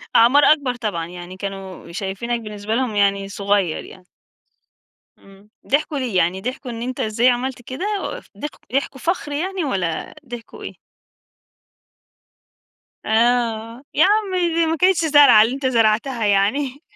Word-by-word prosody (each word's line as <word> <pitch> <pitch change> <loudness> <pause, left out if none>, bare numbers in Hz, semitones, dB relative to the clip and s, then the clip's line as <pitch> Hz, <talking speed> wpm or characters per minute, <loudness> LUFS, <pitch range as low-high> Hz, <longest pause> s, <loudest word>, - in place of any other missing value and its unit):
أعمار 255 +6 +6
أكبر 280 -5 +3
طبعًا، 205 -8 -3
يعني 175 +1 -10
كانوا 195 -3 -7
شايفينك 200 +6 -3
بالنسبة 210 0 -4
لهم 250 -3 -1
يعني 200 -1 +1
صغير 200 -4 0
يعني. 185 -1 -15 1.1
إمم، 195 +1 -19 0.2
ضحكوا 290 +1 0
ليه؟ 250 -7 -3
يعني 180 +2 +1
ضحكوا 250 +4 -5
إن 230 -1 -6
أنت 255 +1 -4
إزاي 225 +3 +2
عملت 250 +1 -1
كده 260 +8 -6 0.2
و - - -4 0.2
ض 295 - -2 0.3
ضحكوا 275 0 -2
فخر 335 -2 -2
يعني، 365 +4 -2
والَّا 185 - -2 0.2
ضحكوا 240 -1 -9
إيه؟ - - -6 2.3
آه، 230 +1 +1
يا 310 - +5
عمي 385 -3 +2
دي 335 0 +2
ما 320 +1 0
كانتش 360 0 +3
زرعة 290 -8 +7
اللي 230 +4 +1
أنت 275 0 -3
زرعتها 230 0 +1
يعني. 250 +8 +1
235 Hz, 140 wpm, -21 LUFS, 200-280 Hz, 2.3 s, زرعة